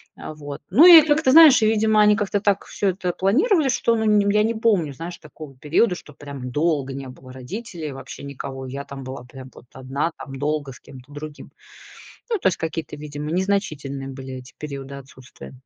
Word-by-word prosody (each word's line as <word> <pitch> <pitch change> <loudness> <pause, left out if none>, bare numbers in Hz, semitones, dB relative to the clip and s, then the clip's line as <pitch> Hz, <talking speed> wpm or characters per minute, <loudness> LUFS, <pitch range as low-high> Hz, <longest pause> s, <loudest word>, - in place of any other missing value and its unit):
А, 155 - -9
вот. 145 -1 -8
Ну 265 - +6
и 345 -3 +11
как-то, 295 -3 +3
знаешь, 305 -6 +8
и, 215 - +4
видимо, 220 -1 +3
они 210 0 +5
как-то 205 -1 -1
так 200 -1 0
всё 200 - -1
это 180 -1 -3
планировали, 295 - +2
что, 235 -2 +1
ну, 210 -2 +2
я 210 +1 +3
не 230 +1 0
помню, 205 -10 +1
знаешь, 170 +5 -8
такого 150 -2 -13
периода, 170 - +1
что 150 - -13
прям 140 -3 -8
долго 145 -2 0
не 135 0 -7
было 130 0 -13
родителей, 155 - -7
вообще 135 - -10
никого. 135 -1 -7
И 130 - -9
я 140 0 -5
там 140 -1 -9
была 130 -1 -8
прям 130 +1 -12
вот - - -15
одна 135 +5 -3
там 135 - -8
долго 145 0 -2
с - - -14
кем-то 130 +1 -15
другим. 145 0 -9 0.8
Ну, 450 -4 0
то - - +1
есть 185 - 0
какие-то, 160 -1 -5
видимо, 150 0 -7
незначительные 155 -8 -2
были 130 0 -8
эти 125 -1 -11
периоды 140 -2 -7
отсутствия. 130 -2 -13
150 Hz, 200 wpm, -22 LUFS, 135-205 Hz, 0.8 s, и